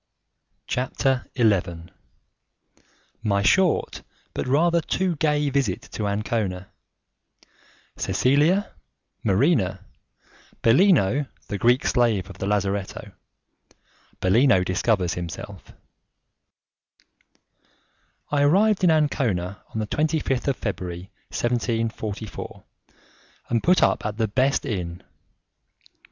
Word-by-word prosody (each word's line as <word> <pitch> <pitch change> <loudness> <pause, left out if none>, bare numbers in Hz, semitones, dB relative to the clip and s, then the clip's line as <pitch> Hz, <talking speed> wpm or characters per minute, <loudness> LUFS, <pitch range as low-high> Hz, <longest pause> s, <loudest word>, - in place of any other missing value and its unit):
CHAPTER 130 0 -1
XI 95 -8 +1 1.4
My 100 -3 +1
Short 185 - +2 0.3
But - - -3
Rather 170 +5 +3
Too 180 +2 -1
Gay 150 -1 +1
Visit 130 -9 0
To 105 - -3
Ancona 100 -3 -2 1.3
Cecilia, 150 +10 +2 0.5
Marina, 100 - +1 0.8
Bellino 140 - +4 0.2
the 100 - -3
Greek 120 +5 +3
Slave 110 -6 +1
of - - -14
the 95 - -3
Lazzaretto 100 -1 -2 1.1
Bellino 110 +1 +4
Discovers 95 -1 0
Himself 85 -2 -7 2.6
I 145 -1 +2
arrived 195 +7 +3
in 180 - +6
Ancona 120 - 0
on - - -6
the 110 - -1
25th 150 0 -1
of 140 - +1
February, 90 -3 -5 0.2
1744, 115 -3 -3 0.9
and 115 -1 +1
put 180 +1 +4
up - - +2
at 105 0 -5
the 110 -1 +1
best 130 +6 +1
inn. 90 -5 -4
115 Hz, 90 wpm, -24 LUFS, 100-145 Hz, 2.6 s, in